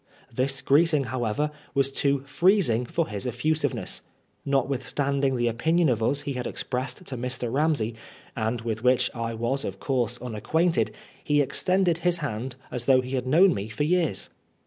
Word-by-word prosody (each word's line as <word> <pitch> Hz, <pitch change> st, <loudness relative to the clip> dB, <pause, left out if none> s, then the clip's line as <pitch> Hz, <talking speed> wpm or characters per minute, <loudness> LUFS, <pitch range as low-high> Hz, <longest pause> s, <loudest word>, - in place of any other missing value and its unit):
This 135 Hz, +3 st, 0 dB
greeting, 150 Hz, 0 st, +4 dB
however, 125 Hz, +4 st, -1 dB, 0.2 s
was 135 Hz, 0 st, +2 dB
too 140 Hz, 0 st, +1 dB
freezing 150 Hz, -, +2 dB
for 165 Hz, +4 st, -1 dB
his 105 Hz, +2 st, -4 dB
effusiveness* 150 Hz, +6 st, -1 dB, 0.4 s
Notwithstanding 135 Hz, 0 st, 0 dB
the 120 Hz, -1 st, +1 dB
opinion 160 Hz, +8 st, +2 dB
of 115 Hz, -3 st, 0 dB
us 140 Hz, +6 st, +1 dB
he 140 Hz, -, -3 dB
had 125 Hz, -1 st, -3 dB
expressed 130 Hz, +6 st, -4 dB
to 135 Hz, -, -4 dB
Mr. 125 Hz, -1 st, -3 dB
Bamsey, 140 Hz, -6 st, +1 dB, 0.4 s
and 115 Hz, 0 st, -1 dB
with 115 Hz, -1 st, -3 dB
which 125 Hz, 0 st, +3 dB
I 115 Hz, -1 st, -3 dB
was 120 Hz, +5 st, -1 dB
of -, -, -5 dB
course 125 Hz, -3 st, -1 dB
unacquainted, 160 Hz, +9 st, 0 dB, 0.3 s
he 145 Hz, -1 st, +2 dB
extended 175 Hz, +5 st, +2 dB
his 175 Hz, 0 st, +2 dB
hand 130 Hz, -4 st, -4 dB, 0.2 s
as 120 Hz, -1 st, -3 dB
though 130 Hz, -1 st, +6 dB
he 125 Hz, 0 st, -8 dB
had. 130 Hz, -1 st, -2 dB
known 175 Hz, +7 st, +6 dB
me 100 Hz, +2 st, -4 dB
for 130 Hz, +7 st, -2 dB
years. 170 Hz, 0 st, 0 dB
135 Hz, 165 wpm, -26 LUFS, 120-150 Hz, 0.4 s, though